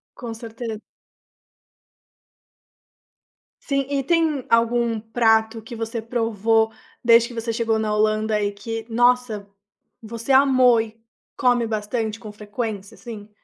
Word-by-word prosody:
Com 235 -3 -6
certeza. 225 -1 -6 2.8
Sim. 275 -2 -1
E 280 -1 0
tem 315 -3 +1
algum 230 0 +2
prato 225 0 +2
que 225 +2 -9
você 225 0 -4
provou 225 -1 +1 0.3
desde 235 0 +6
que 240 - -10
você 230 0 -2
chegou 225 -1 +1
na 215 -1 -1
Holanda 215 0 +1
e 205 0 0
que 225 +2 -6
nossa 240 -3 +2 0.5
você 230 +3 -5
amou 260 -3 +5
e 225 0 -9 0.4
come 245 -2 +2
bastante 220 0 -2
com 215 -2 -9
frequência 210 -1 -5
assim? 215 -4 -9
225 Hz, 120 wpm, -22 LUFS, 220-240 Hz, 2.8 s, desde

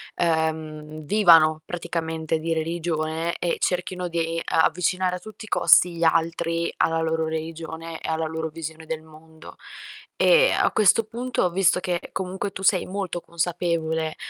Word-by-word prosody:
uhm, 155 -2 -2
vivano 165 -5 +5
praticamente 160 -2 -3
di 165 +1 -1
religione, 160 0 -2
e 175 - -1
cerchino 180 0 -1
di 165 -1 -2
a-avvicinare 180 +2 +1
a - - -13
tutti 215 +4 -11
i - - -14
costi 175 -1 +5
gli 170 - -2
altri 165 +1 0
alla 165 0 +1
loro 160 0 0
religione, 160 +1 -6
e - - -6
alla 160 0 -1
loro 160 0 -3
visione 160 0 -8
del 160 0 -4
mondo. 160 0 -15 0.6
E, - - +5
a - - +2
questo 215 +2 +4
punto 235 -4 -1
visto 180 0 +3
che 175 -1 -3
comunque 190 +2 -3
tu 195 - -8
sei 185 -1 +3
molto 190 -2 -3
consapevole, 165 -2 -2
165 Hz, 145 wpm, -24 LUFS, 160-180 Hz, 0.6 s, vivano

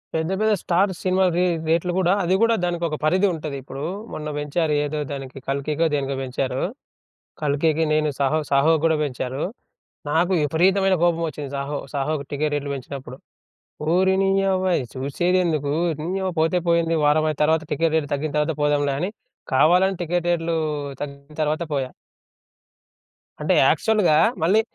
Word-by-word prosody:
పెద్ద, 160 +2 -1
పెద్ద 215 0 +2
star 190 +3 +2
cinema 185 0 +2
రే 180 - +3 0.2
రేట్లు 170 +2 +2
గూడా 185 -1 +3
అది 180 +2 +2
గూడా 230 0 +4
దానికొక 170 -3 -1
పరిధి 185 +6 +3
ఉంటది. 155 -3 -5
ఇప్పుడు 135 +1 -8 0.3
మొన్న 155 0 -5
బెంచారు 150 +2 -1
ఏదో 150 +1 -3
దానికి 135 -1 -7
'కల్కికో' 145 +4 0
దేనికో 140 -1 -1
బెంచారు. 130 0 -2 0.8
'కల్కికి' 155 +2 +1
నేను 155 0 +2
'సాహో 140 +3 +2
సాహోకి' 155 +3 +4
గూడా 160 -1 +3
బెంచారు, 130 0 -4 0.7
నాకు 175 +4 +2
విపరీతమైన 185 +6 +3
కోపమొచ్చింది 160 -5 -1
'సాహో,' 140 +1 -3
'సాహోకి' 140 0 -2
టికెట్ 150 +1 -1
రేట్లు 145 -1 -3
బెంచినప్పుడు. 130 -1 -8 0.8
ఓరి 190 +1 +3
నీయవ్వ 195 -1 +1 0.2
ఈ - - -5
సూసేదెందుకు, 155 +2 0 0.3
నీయవ 190 +2 -2
పోతే 165 +3 +2
పోయింది 165 -1 +2
వారం 155 +1 +3
అయిన 150 - -9
తర్వాత 160 +1 +2
టికెట్ 165 +2 +1
రేట్ 150 -2 +1
తగ్గిన 145 +1 -2
తర్వాత 150 +1 0
పోదాంలే 145 -1 +2
అని 180 +5 -1 0.5
కావాలని 180 +7 +4
టికెట్ 175 +1 -1
రేట్లు 165 -1 0 0.5
తగ్గిన 140 +1 -10
తర్వాత 155 +3 -1
పోయా. 130 -2 -2 1.5
అంటే, - - +2 0.2
యాక్చువల్‌గా 210 -8 +3 0.3
మళ్ళీ 200 +7 +4
155 Hz, 145 wpm, -23 LUFS, 145-175 Hz, 1.5 s, గూడా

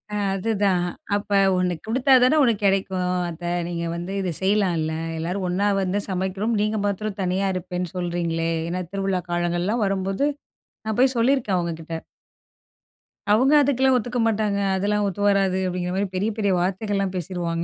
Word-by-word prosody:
ஆ - - 0 0.2
அதுதான். 195 -3 +1 0.3
அப்ப 205 0 -4 0.2
ஒண்ணு 180 -1 +1
குடுத்தா 255 +4 +2
தானே 255 +5 +4
ஒண்ணு 235 -4 +4
கிடைக்கும் 190 -2 +1 0.2
அத்தை. 175 +1 -5 0.2
நீங்க 170 -1 -3
வந்து 175 +3 -5
இத 185 - -1
செய்யலாம்ல, 185 -6 +1 0.2
எல்லாரும் 180 +4 -2
ஒண்ணா 200 +3 +1
வந்து 190 +2 0
சமைக்கிறோம். 190 +4 -1
நீங்க 215 +1 0
மாத்திரம் 205 0 -2
தனியா 190 +2 0
இருப்பேன்னு 180 -1 -4
சொல்கிறீங்களே. 170 -2 -1 0.2
ஏன்னா 180 +2 -2
திருவிழா 195 -2 -1
காலங்கள்லாம் 175 +6 0
வரும்போது 195 +5 0 0.6
நான் 220 -1 -2
போய் 260 0 +4
சொல்லியிருக்கேன், 235 -4 +2
அவுங்ககிட்ட. 165 -1 -4 1.4
அவுங்க 260 +7 +4
அதுக்கெல்லாம் 265 -1 +3
ஒத்துக்க 245 +1 -2
மாட்டாங்க. 210 -2 0 0.2
"அதெல்லாம் 205 +2 0
ஒத்து 200 +1 -4
வராது." 195 -2 +2
அப்படிங்கிற 180 0 -2
மாதிரி 195 0 -1
பெரிய, 205 +4 0
பெரிய 200 -2 +2
வார்த்தைகள்லாம் 195 +1 -1
பேசிருவாங்க. 170 -1 -3
190 Hz, 145 wpm, -23 LUFS, 180-210 Hz, 1.4 s, தானே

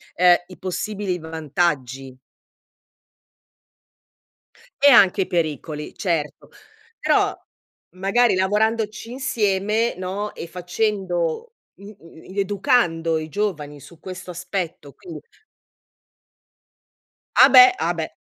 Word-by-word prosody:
uhm, 180 0 +6
i 185 - -13
possibili 190 0 -4
vantaggi? 145 -5 -3 2.7
E 285 - +7
anche 195 -5 +6
i - - -1
pericoli, 155 -2 -3
certo. 160 -7 -3 0.5
Però, - - +2 0.6
magari, 200 +4 +2
lavorandoci 215 +3 -1
insieme, 220 -3 0
no, 195 +3 -4
e 170 - -8
facendo, 180 - -2 0.2
mhmm, 200 +1 -13 0.4
i 200 - -3
educando 195 - +1
i 155 0 -6
giovani 150 -6 -3
su 170 +3 -16
questo 185 -1 -8
aspetto, 175 -5 -5
quin 350 -2 -10 2.2
Ah, - - +8
beh! 380 -1 +8
Ah, - - 0
beh. - - -4
185 Hz, 95 wpm, -22 LUFS, 165-210 Hz, 2.7 s, Ah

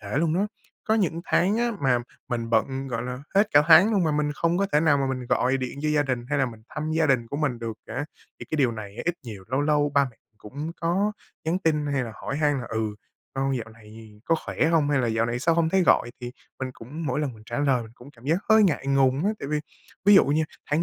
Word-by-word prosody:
kể 105 +3 -6
luôn 160 0 +1
đó. 195 +3 +1 0.4
Có 220 - +2
những 170 -6 0
tháng 195 +5 +2
á 240 0 +1
mà 130 -3 +3 0.3
mình 115 -1 -3
bận, 130 +4 0
gọi 115 -2 -3
là, 125 +1 -5 0.2
hết 205 +2 +4
cả 145 - +6
tháng 190 +7 +8
luôn 195 -4 +2
mà 155 - +1
mình 150 0 0
không 170 +2 +1
có 200 - +2
thể 150 - +4
nào 155 -3 +4
mà 135 - 0
mình 130 -2 -3
gọi 130 +2 +2
điện 130 +1 -5
cho 155 - 0
gia 150 -1 +3
đình 125 -4 -3
hay 145 - 0
là 135 - +2
mình 115 -3 -10
thăm 155 0 -4
gia 160 0 +2
đình 125 -4 +2
của 140 - -5
mình 145 -5 -1
được 115 -1 -5
cả. 130 +6 -4 0.4
Thì - - -6
cái 155 - -1
điều 130 -5 +2
này 105 -2 -8
á, - - -5
ít 175 - 0
nhiều 105 -5 -8
lâu 130 +3 0
lâu 145 0 +2
ba 140 0 +5
mẹ 115 - -25 0.2
cũng 145 +9 -6
có 190 +5 +1 0.3
nhắn 165 +3 0
tin 155 -5 0
hay 140 -3 0
là 115 - -7
hỏi 140 - -5
han 145 -2 +1
là 120 - -7
"Ừ, 110 -2 -2 0.4
con 135 0 0
dạo 110 -2 -5
này 110 -1 -15
có 165 - +2
khỏe - - 0
hông 160 -3 +2
hay 145 - +3
là 120 - 0
dạo 115 0 +1
này 120 +1 -2
sao 165 +6 +2
hông 165 -1 +2
thấy 190 +2 +3
gọi?". 120 - +3
Thì 120 0 -6 0.3
mình 130 -1 -3
cũng 145 +8 -8
mỗi 135 +3 0
lần 145 -4 -2
mình 110 - -15
trả 120 - -4
lời 135 -4 +2
mình 110 -1 -12
cũng 125 +3 -14
cảm 120 -4 -20
giác 155 +4 +2
hơi 220 0 +7
ngại 160 -8 +1
ngùng 135 +2 +2
á, 205 - +3
tại 140 - -6
vì 150 0 0 0.4
ví 205 +1 +7
dụ 195 - +7
nha, 150 +3 +1 0.3
tháng 155 +3 +2
140 Hz, 275 wpm, -25 LUFS, 120-160 Hz, 0.4 s, tháng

